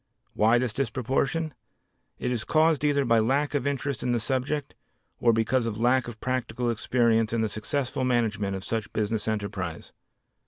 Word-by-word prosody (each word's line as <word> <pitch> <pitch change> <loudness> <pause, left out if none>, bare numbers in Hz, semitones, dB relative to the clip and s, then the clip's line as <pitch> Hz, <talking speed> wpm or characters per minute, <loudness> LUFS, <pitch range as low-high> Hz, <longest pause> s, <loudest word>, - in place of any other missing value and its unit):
Why 110 +3 +4
this 120 -3 0
disproportion? 135 +6 -1 0.6
It - - -2
is 120 -3 -1
caused 155 -1 +3
either 145 -2 +2
by 115 -1 +4
lack 135 +7 +1
of 140 -1 0
interest 140 -1 -2
in 125 - 0
the 120 - +1
subject, 135 +4 -2 0.5
or 120 - +4
because 115 +2 +1
of 110 -1 -4
lack 125 +2 +3
of 115 -2 -8
practical 125 -2 -1
experience 115 0 +2
in 115 - +1
the 110 - +1
successful 125 +6 -2
management 110 -5 0
of 95 - -6
such 110 0 -3
business 110 0 -1
enterprise. 100 -6 -4
120 Hz, 165 wpm, -27 LUFS, 110-130 Hz, 0.6 s, Why